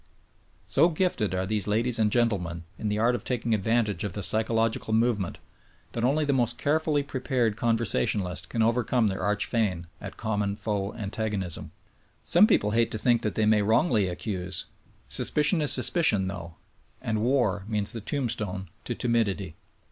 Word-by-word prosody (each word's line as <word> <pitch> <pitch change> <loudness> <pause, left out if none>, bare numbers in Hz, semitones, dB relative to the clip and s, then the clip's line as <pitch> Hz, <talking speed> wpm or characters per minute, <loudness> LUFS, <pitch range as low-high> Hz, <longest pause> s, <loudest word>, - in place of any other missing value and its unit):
So 170 - +3
gifted 155 - -1
are 95 +1 -1
these 105 0 -2
ladies 115 +3 +2
and 105 -1 +2
gentlemen 95 -8 0 0.2
in 105 - -2
the 105 - -1
art 115 +3 +2
of 120 - -4
taking 120 -2 -1
advantage 110 0 0
of 100 -4 -4
the 105 - -4
psychological 110 +1 +1
moment 110 -5 0 0.5
that 115 - -4
only 145 +5 +2
the 140 - +1
m.ost 120 -2 +1
carefully 150 0 0
prepared 130 -5 -1
conversational 110 - +1
ist 90 - -3
can 115 - 0
overcome 115 0 +1
their 95 - -4
arch 105 +2 0
feign 100 -7 -1 0.2
at - - -8
common 105 -2 -2
foe 105 -1 -3
antagonism. 100 -4 -3 0.5
Some 185 +5 +5
people 105 - +2
hate 115 +1 +2
to - - -4
think 120 +1 +2
that 105 - -3
they 110 - +1
may 105 -1 +3
wrongly 110 - +2
accuse. 90 -1 -4 0.4
Suspicion 150 +3 +2
is 150 - +6
sus 130 - +7
picion, 110 - +3
though, 85 -3 -8 0.4
and 110 -2 -2
war 115 -6 +1
means 105 -2 0
the 115 - -6
tombstone 105 - -3 0.2
to - - -3
timidity. 105 -8 -1
110 Hz, 170 wpm, -26 LUFS, 100-120 Hz, 0.5 s, sus